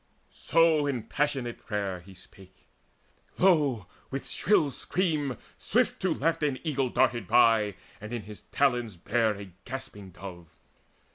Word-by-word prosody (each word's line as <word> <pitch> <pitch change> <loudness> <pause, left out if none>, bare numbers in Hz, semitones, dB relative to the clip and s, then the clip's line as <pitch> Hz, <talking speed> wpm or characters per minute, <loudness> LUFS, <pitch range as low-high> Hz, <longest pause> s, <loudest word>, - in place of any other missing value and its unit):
In 150 -7 +4
passionate 130 -1 -2
prayer 100 -4 -2
he 95 +2 -15
spake: 95 0 -18 0.7
lo, 145 - +3 0.2
with 135 0 -5
shrill 160 -8 +2
scream 150 - -1 0.2
Swiftly - - +1
to - - -11
left 165 +3 +1
an 145 -3 +1
eagle 140 -5 0
darted 120 -4 +1
by 110 -3 +4 0.3
And 105 +2 -8
in 120 -3 -4
his 105 0 -10
talons 120 -8 +1
bare 110 +4 +1
a 100 -1 -9
gasping 130 -7 -7
dove. 90 -2 -10
120 Hz, 130 wpm, -28 LUFS, 100-140 Hz, 0.7 s, In